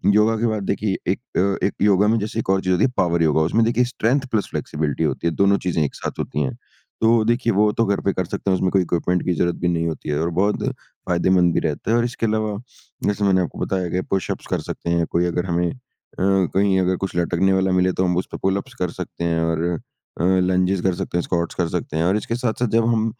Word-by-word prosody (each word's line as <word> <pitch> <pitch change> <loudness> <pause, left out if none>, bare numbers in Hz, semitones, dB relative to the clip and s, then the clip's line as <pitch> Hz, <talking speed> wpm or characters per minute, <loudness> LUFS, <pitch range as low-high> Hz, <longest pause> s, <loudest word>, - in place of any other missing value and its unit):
योगा 110 +1 +4
के 115 +2 +1
बाद 110 -2 -1
देखिए 100 0 -1
एक 100 - -2 0.2
अ, 100 +1 +1
एक - - -4
योगा 105 0 +4
में 115 +1 +3
जैसे 110 +2 -3
एक 100 - -4
और 95 0 +3
चीज़ 95 0 +1
होती 90 - +3
है 130 - 0
पावर 85 -2 +2
योगा। 80 0 +3
उसमें 115 - +3
देखिए 120 +1 +2
स्ट्रेंथ 135 +5 +1
प्लस 110 -3 0
फ्लैक्सिबिलिटी 75 -2 -2
होती 85 - -1
है। 80 - 0
दोनों 100 0 +4
चीज़ें 80 -3 +1
एक 70 - -3
साथ - - -6
होती 75 - -2
है 65 - -2 0.5
तो 115 0 +4
देखिए 120 -1 +1
वो 105 +1 +3
तो 115 - +1
घर 100 0 0
पे 100 - 0
कर 95 - -1
सकते 95 +2 -2
हैं - - +4
उसमें 90 0 0
कोई 95 - +3
इक्विपमेंट 90 +1 0
की 90 - +1
ज़रूरत 85 +2 +1
भी 90 - +1
नहीं 85 -1 0
होती 80 -1 -5
है। 75 - 0
और 85 - 0
बहुत 105 +1 0
फ़ायदेमंद 90 -1 0
भी - - +2
रहता 75 +8 -2
है। 120 - +4
और 120 - +2
इसके 120 -1 -2
अलावा 110 -1 -1 0.5
जैसे 105 0 0
मैंने 95 -1 +3
आपको 85 - -4
बताया 95 -2 -2
कि 90 +2 -1
पुशअप्स 95 - -2
कर - - -1
सकते 85 - -4
हैं 85 -1 +2
कोई 85 +1 +2
अगर 90 +1 -1
हमें 85 -1 0
अ, - - -9 0.8
कहीं 95 -1 +3
अगर 95 0 +1
कुछ 95 - -3
लटकने 90 +2 +2
वाला 95 0 +2
मिले 90 0 +3
तो 95 - +2
हम 90 -1 +1
उसपे 90 - -3
पुलअप्स 100 +7 -1
कर 90 -2 0
सकते 85 - -7
हैं। 85 -1 +1
और 80 -1 0 0.6
अ, - - 0
लंजेस 90 0 +2
कर 95 -2 +1
सकते 85 - -3
हैं, - - +2
स्कॉट्स 85 -1 -2
कर 85 -2 0
सकते 80 - -3
हैं। 80 - +1
और 95 +4 +2
इसके 115 +2 -3
साथ-साथ 120 0 -1
जब 115 0 +4
हम 115 -1 +2
95 Hz, 255 wpm, -21 LUFS, 85-105 Hz, 0.8 s, योगा